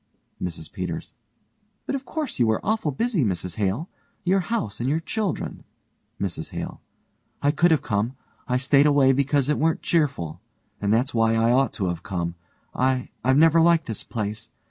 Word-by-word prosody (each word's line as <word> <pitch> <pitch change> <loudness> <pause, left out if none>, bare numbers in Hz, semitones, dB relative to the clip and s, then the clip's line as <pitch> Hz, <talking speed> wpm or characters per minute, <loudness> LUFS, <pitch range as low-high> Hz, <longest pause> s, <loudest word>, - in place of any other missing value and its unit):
MRS 85 -3 -5
PETERS: 90 -5 -5 0.7
But - - -2
of 275 0 -3
course 310 - -4
you 120 - +4
were 110 0 +2
awful 215 -6 +1
busy, 185 - 0
Mrs 90 -4 -2
Hale 105 - 0 0.4
your 190 +1 +3
house 180 - -2
and 120 +3 0
your 155 +3 +1
children. 200 +2 -3 0.6
MRS 85 -5 -3
HALE: - - -6 0.6
I 145 - +4
could've 160 0 +3
come. 110 +5 -1 0.3
I 125 - +2
stayed 140 +2 +4
away 140 -2 +5
because 140 0 +2
it 150 - +1
weren't 160 +1 +1
cheerful 140 - 0 0.4
and 100 0 +1
that's 120 +4 +2
why 115 -1 +3
I 115 +1 +3
ought 130 -1 +3
to 100 - -2
have 85 -1 -3
come. 85 -3 -3 0.4
I 130 0 +1
I've 130 +1 +4
never 165 +1 +6
liked 170 0 +4
this 110 -3 -4
place. 110 0 -4
130 Hz, 170 wpm, -24 LUFS, 105-160 Hz, 0.7 s, never